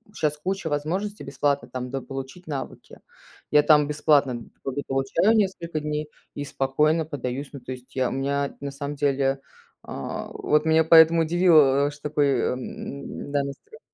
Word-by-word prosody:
щас 150 -1 0
куча 185 +1 -3
возможностей 185 +8 -2
бесплатно 140 -2 -1
там 125 0 -5
дополучить 135 +5 -6
навыки. 140 -4 -7 0.5
Я 150 0 +5
там 150 -2 +5
бесплатно 145 -3 +2
д - - -13
как 135 - -3
бы 145 - -2
получаю 135 +10 +2
несколько 175 -6 0
дней 150 0 -3 0.3
и 145 - -4
спокойно 150 +4 +1
подаюсь. 140 -2 -4
Ну 140 - -7
то 125 +1 -9
есть 125 0 -10
я 130 -1 +1
У - - -6
меня, 140 +1 -1
на 140 - -3
самом 140 +1 -5
деле 135 -1 +1 0.4
А 70 - -5
вот 150 +1 +1
меня 160 0 +4
поэтому 165 +1 +7
удивило, 155 -5 +4
что 150 0 -7
такой, 150 -1 +2
э, - - +1
м-да, 140 +2 -5
настрой. 140 - -9
145 Hz, 165 wpm, -25 LUFS, 135-155 Hz, 0.5 s, поэтому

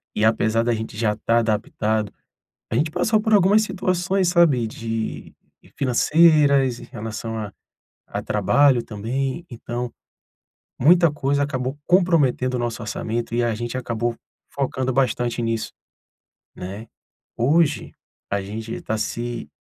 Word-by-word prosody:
e 105 - +2
apesar 110 0 +2
da 120 0 +1
gente 110 -1 -5
já 110 -1 +1
estar 115 +2 0
adaptado, 110 -1 -1 0.6
a - - 0
gente 150 +6 +1
passou 215 +5 +1
por 220 -1 +1
algumas 205 +2 +5
situações, 185 -2 0
sabe, 165 -9 +4
de 115 0 -5 0.4
financeiras 140 -1 +4
em - - -10
relação 115 0 -6
a 105 -2 -5 0.6
a - - -4
trabalho 140 -4 +3
também. 130 +9 -3
Então, 120 0 -5 0.9
muita 170 +3 +5
coisa 140 -1 0
acabou 130 -1 -3
comprometendo 165 -9 +3
o 125 - -1
nosso 120 0 -3
orçamento 115 +2 -3
e 120 - +2
a 120 -1 +1
gente 120 +3 -4
acabou 120 -1 -2 0.4
focando 130 -2 -1
bastante 120 -2 0
nisso, 115 -1 -2 0.9
né. 100 +5 -7 0.5
Hoje, 150 +6 +2 0.4
a 100 0 0
gente 110 +3 -6
tá 110 - -2
se 120 +1 -4
120 Hz, 130 wpm, -22 LUFS, 115-145 Hz, 0.9 s, algumas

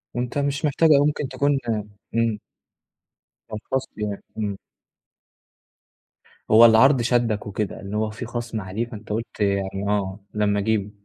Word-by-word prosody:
وأنت 125 +2 -2
مش 140 +2 0
محتاج 155 +3 +3
أوي 145 -1 +6
ممكن 145 -1 -2
تكون 140 +1 +1 0.6
إمم. 115 -2 +1 1.1
كان 110 - -5
خصْم 130 0 -1
يعني، 105 -2 -4
إمم. 105 -3 -2 1.9
هو 110 +2 +9
العرض 120 +4 +6
شدَّك 115 -3 +1
وكده، 105 0 -3
إن 100 +1 -7
هو 110 0 0
فيه 110 +3 -7
خصْم 120 -1 -4
عليه 100 +5 -3
فأنت 110 -2 -11
قُلت 115 +3 -4
يعني 100 -1 0
آه، 100 -1 -1
لمّا 105 -1 +1
أجيبه، 105 -1 0
110 Hz, 140 wpm, -23 LUFS, 105-125 Hz, 1.9 s, هو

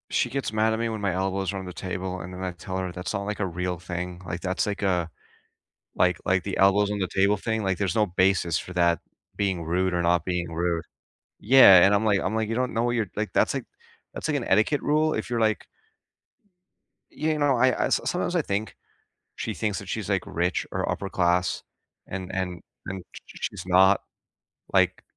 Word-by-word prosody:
She - - +2
gets 135 -4 -3
mad 110 +1 +2
at 110 - -2
me 115 0 0
when 110 -2 -4
my 100 -2 0
elbows 95 +1 -1
are - - -4
on 95 - -6
the 90 - -7
table, 95 +1 -4
and 90 +2 -8
then 90 +1 -6
I 95 - -2
tell 95 +2 -6
her 95 -1 -3
that's 90 +2 -5
not, 100 -1 -2
like, 105 0 -4
a 100 - 0
real 90 0 -3
thing, 90 +1 -5
like, 85 -2 -5
that's, 95 0 -1
like, 100 -1 -3
a 90 -4 +1 0.9
like 90 -2 +3
like, 95 -1 +2
the 100 - -3
elbows 100 +1 +4
on 105 - -2
the 95 - 0
table 100 +2 +3
thing, 110 +1 -2
like, 95 -2 0
there's 95 -4 -1
no 110 - +4
basis 90 -2 +2
for 90 - -7
that 85 -2 +2 0.4
being 95 -4 -1
rude 90 +3 0
or 90 - +1
not 85 -1 +2
being 90 -2 -2
rude. 85 0 -1 0.6
Yeah, 105 -7 +8
and 100 - +4
I'm 100 - +1
like 100 -2 +3
I'm 110 - -2
like, 110 -1 -1
"You 115 - -1
don't 125 +1 -1
know 115 +1 +1
what 120 - +1
you're" 115 -3 0
like, 105 0 -2
that's, - - +2
like - - -3 0.5
that's, - - -4
like, - - +1
an - - -3
etiquette 110 +9 +2
rule, 155 +1 +2
if - - -4
you're, 120 -1 -1
like 110 -2 +1 1.5
You 155 0 -1
know, 145 -3 +2
I 130 +2 +4
I - - 0
s - - +2
sometimes - - -1
I - - +3
think 100 +2 -3 0.6
she - - -3
thinks - - -2
that - - -10
she's, - - -3
like, - - +1
rich, 90 +2 -1
or - - -2
upper 100 - -4
class, 90 0 +1 0.4
and 95 -1 -5
and 90 -2 -3 0.3
and 95 -1 -5
sh - - -9
sh - - -4
she's - - -8
not. 95 +2 +5 0.7
Like, - - +2
95 Hz, 225 wpm, -26 LUFS, 90-105 Hz, 1.5 s, Yeah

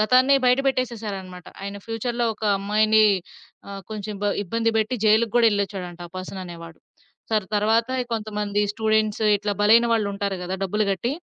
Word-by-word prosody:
గతాన్నే 255 +5 +4
బయట 250 +2 +4
పెట్టేసేసారన్నమాట. 210 -8 -3 0.2
ఆయన 200 0 -5
ఫ్యూచర్‌లో 235 +1 -2
ఒక 215 - -8
అమ్మాయిని 215 +2 +3 0.7
ఆహ్, 195 -1 -7
కొంచెం 210 -1 -5
బ - - +1 0.2
ఇబ్బంది 230 +4 0
పెట్టి 220 +4 0
జైల్‌కి 220 +1 +3
గూడా 235 -1 +5
ఎళ్లొచ్చాచ్చాడంట 190 -4 -3
ఆ - - -31
పర్సన్ 190 +1 -7
అనేవాడు. 170 -1 -10 0.5
సరే 215 -3 +1
తరువాత 225 +3 +2
ఈ - - -7
కొంతమంది 210 -1 -2
స్టూడెంట్స్ 220 -1 +1 0.2
ఇట్లా 205 0 -2
బలైన 230 +3 +6
వాళ్లుంటారు 200 -2 -2
గదా! 185 +2 -3
డబ్బులు 210 +3 0
గట్టి, 235 +7 -2
215 Hz, 155 wpm, -23 LUFS, 200-225 Hz, 0.7 s, బలైన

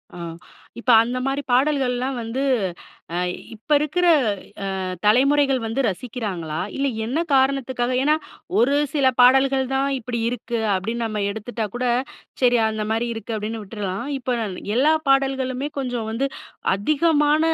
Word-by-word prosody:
ஆ - - -9 0.6
இப்போ 245 +1 +2
அந்த 245 +2 -3
மாதிரி 270 +1 0
பாடல்கள்லாம் 260 -1 +1
வந்து 230 +4 -3 0.7
அ - - 0 0.4
இப்போ 225 +8 -2
இருக்கிற 305 +5 0 0.7
அ - - -3 0.3
தலைமுறைகள் 270 +4 +4
வந்து 225 +4 -1
ரசிக்கிறாங்களா? 190 -6 -4 0.2
இல்ல 275 - 0 0.2
என்ன 255 +7 -1 0.2
காரணத்துக்காக, 265 -2 +1
ஏன்னா 300 +2 +3 0.4
ஒரு 250 +5 +4 0.2
சில 280 -3 +2
பாடல்கள் 265 +1 +5
தான் 270 +1 +1
இப்படி 235 0 -4
இருக்கு. 240 0 -3 0.2
அப்படின்னு 225 +5 -2
நம்ம 215 -2 -2
எடுத்துட்டா 220 +1 -4
கூட 250 +1 -1 0.6
சரி 245 -1 +5
அந்த 215 -1 -3
மாதிரி 225 +2 0
இருக்கு. 225 0 -5
அப்படின்னு 215 +1 -4
விட்றலாம். 200 +2 -4
இப்போ 250 -1 -2 0.4
எல்லா 290 +5 +4 0.2
பாடல்களுமே 270 0 +1
கொஞ்சம் 245 -4 -3
வந்து 255 +5 -1 0.5
அதிகமான 300 - +2
250 Hz, 135 wpm, -22 LUFS, 225-270 Hz, 0.7 s, பாடல்கள்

